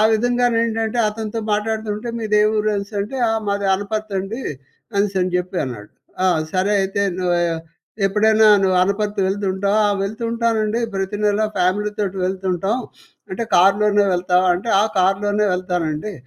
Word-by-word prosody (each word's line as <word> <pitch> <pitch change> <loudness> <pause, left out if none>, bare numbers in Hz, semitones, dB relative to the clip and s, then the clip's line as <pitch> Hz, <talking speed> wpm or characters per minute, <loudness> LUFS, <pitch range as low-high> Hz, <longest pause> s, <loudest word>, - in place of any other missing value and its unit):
విధంగానేంటంటే 230 -1 0
అతనితో 220 +1 -4
మాటాడుతూ 220 +1 -1
ఉంటే 225 +3 -7
మీదే 210 -1 +2
ఊరు 215 0 +1
అనేసంటే 200 +4 -4
ఆహ్, 225 - 0
"మాది 200 0 -1
అనపర్తండి" 205 +2 -4 0.6
అనేసని 195 -2 +1
జెప్పి 180 +1 -3
అన్నాడు. 115 -6 -8 0.3
ఆ! - - +4 0.3
సరే 190 +3 +1
అయితే 195 +1 -1 0.2
నువ్వూ 175 -1 +1 0.7
ఎప్పుడైనా 220 +2 +3 0.2
నువ్వు 185 -1 +2
అనపర్తి 205 +2 -1
వెళ్తుంటావా? 200 +1 0
"ఆ! - - +2
వెళ్తుంటానండి 230 +1 -1
ప్రతి 195 +1 -2
నెల 205 0 +2 0.2
ఫ్యామిలీ 190 +4 +1
తోటి 195 -2 -2
వెళ్తుంటాం." 190 +3 -1 0.5
అంటే 230 +5 -3
కార్లోనే 205 +3 +4
వెళ్తావా? 180 +1 +2
అంటే 190 +6 -5
"ఆ! - - +4 0.2
కార్లోనే 205 +3 +2
వెళ్తానండి." 180 0 -2
205 Hz, 130 wpm, -20 LUFS, 190-215 Hz, 0.7 s, ఆ